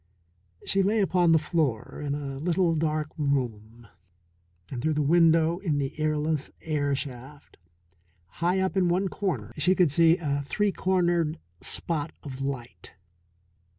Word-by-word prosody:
She 195 - +2
lay 210 +3 +2
upon 180 -4 +3
the 165 - +6
floor 150 -8 -1
in 145 -1 -1
a 140 -2 -5
little 170 +2 +1
dark 155 -1 -1
room, 120 -5 -2 0.9
and 125 -3 -4
through 155 +2 0
the 150 - +1
window 165 +2 +4
in 165 -7 -1
the 135 -2 -2
airless 155 -1 0
air 145 -3 0
shaft, 135 +1 -8 0.8
high 180 +3 +2
up 190 0 -1
in 185 -2 +3
one 185 +2 +1
corner, 130 - -3
she 180 +6 +3
could 175 -6 +3
see 165 +2 +5
a 145 -4 -1
three 205 +4 +1
cornered 175 -4 +1 0.2
spot 160 -2 -3
of 135 -3 -7
light. 135 -3 -5
155 Hz, 145 wpm, -27 LUFS, 140-175 Hz, 0.9 s, the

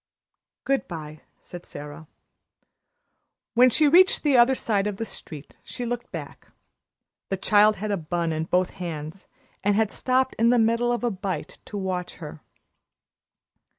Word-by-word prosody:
"Good 275 0 0
bye," 155 -3 -8 0.2
said 175 -1 -10
Sara. 145 +2 -10 1.5
When 250 +2 +6
she 300 +5 +3
reached 365 +6 +5
the 290 -3 +3
other 245 +2 +6
side 205 -5 0
of 205 -2 -4
the 225 - -3
street 155 -8 -10
she 245 - -6
looked 240 0 -4
back. - - -8 0.8
The 195 - -1
child 210 +2 +4
had 210 +1 -4
a 200 - +1
bun 170 0 -2
in 155 0 -2
both 180 +2 +1
hands, 165 0 -7 0.4
and 205 0 +2
had 220 -1 +1
stopped 260 +1 +1
in 230 +1 +4
the 245 - +4
middle 230 +1 +2
of 240 0 -2
a 240 - +1
bite 190 -1 -5
to 205 - -7
watch 185 -2 -3
her. 155 -2 -9
205 Hz, 155 wpm, -25 LUFS, 175-240 Hz, 1.5 s, When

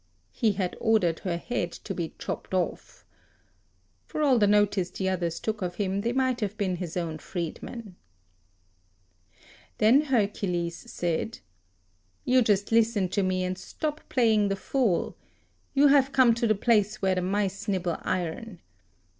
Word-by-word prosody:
He 215 - +1
had 185 -2 -2
ordered 215 -8 +2
her 175 -3 -2
head 175 -3 -3
to - - -6
be 165 -2 -4
chopped - - -5
off. 180 -3 -3 1.0
For 305 - -2
all 265 -5 +4
the 205 - +4
notice 205 -3 +3
the 190 - -3
others 170 -3 -1
took 220 -1 -3
of 175 -1 -3
him, 195 +1 -1
they 230 +3 0
might 260 -1 +1
have 210 -1 -3
been 185 -3 -1
his 175 -1 -5
own 165 -3 -3
freedmen. 185 +5 -6 1.8
Then 230 +7 +5
Hercules 200 - -1
said, 175 +6 -2 0.9
"You 255 0 +4
just 205 -3 +1
listen 225 -4 +3
to 200 - 0
me, 185 -1 0
and 185 0 -2
7 - - -10
stop 305 0 -3
playing 220 -5 +3
the 195 - 0
fool. 220 -2 0 0.6
You 280 +1 +5
have 275 -1 +4
come 255 -3 +6
to 235 0 0
the 215 - +3
place 210 -1 +1
where 190 -1 +3
the 185 - 0
mice 195 +1 -1
nibble 180 -4 -1
iron. 185 +2 -3
200 Hz, 155 wpm, -27 LUFS, 180-230 Hz, 1.8 s, come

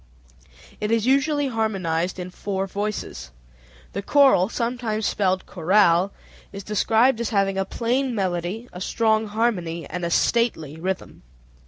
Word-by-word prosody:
It 210 - -2
is 225 -1 +1
usually 280 +2 +2
harmonized 185 -7 -1
in 180 0 -6
four 195 +1 -3
voices. 200 - -4 0.6
The 200 - -3
choral 265 -6 +4
(sometimes 230 -3 -2
spelled 190 -2 0
chorale) 185 +1 +3 0.4
is 200 0 -8
described 225 +4 +2
as 235 - -1
having 195 -2 +1
"a 195 - 0
plain 245 +4 -1
melody, 185 +3 -2
a 180 - -8
strong 220 +1 +1
harmony, 200 -7 -1
and 180 - -5
a 170 - 0
stately 170 - +1
rhythm." 185 +3 -4
205 Hz, 135 wpm, -23 LUFS, 185-230 Hz, 0.6 s, choral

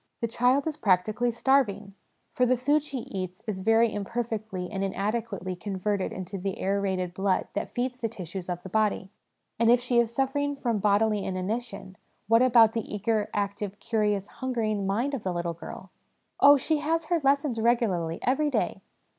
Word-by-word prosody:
The 230 - -1
child 250 +4 +2
is 310 -2 -3
practically 210 +5 +2
starving; 225 -5 +1 0.4
for 250 - +2
the 255 +1 +3
food 290 +5 +2
she 280 -4 -5
eats 185 -3 -6
is 210 -4 -3
very 225 +3 +3
imperfectly 215 -3 -3
and 195 0 -2
inadequately 200 -1 -2
converted 195 +1 -2
into 190 +1 -6
the 195 +1 -4
aerated 190 -2 -1
blood 190 0 0
that 205 - -3
feeds 250 +1 -2
the 230 - -2
tissues 185 -3 -7
of 175 0 -4
the - - -7
body. 210 -2 0 0.5
And 230 0 +4
if 240 +1 +6
she 245 -1 +1
is 235 -1 +1
suffering 285 +3 0
from 235 -6 -1
bodily 210 0 +2
inanition, 190 +1 -4 0.3
what 230 +2 +5
about 230 -3 +6
the 230 - -4
eager, 210 +1 0
active, 205 0 -3
curious, 210 -3 0
hungering 215 -5 -2
mind 235 +9 0
of 270 - -2
the 185 - -2
little 170 -1 -2
girl? 180 +3 -10 0.2
( - - -47
Oh, 285 +1 +8
she 310 +3 0
has 325 +2 0
her 335 0 0
lessons 275 -4 +2
regularly 195 -9 +1
every 285 +4 +2
day.' - - -1
215 Hz, 175 wpm, -27 LUFS, 195-245 Hz, 0.5 s, Oh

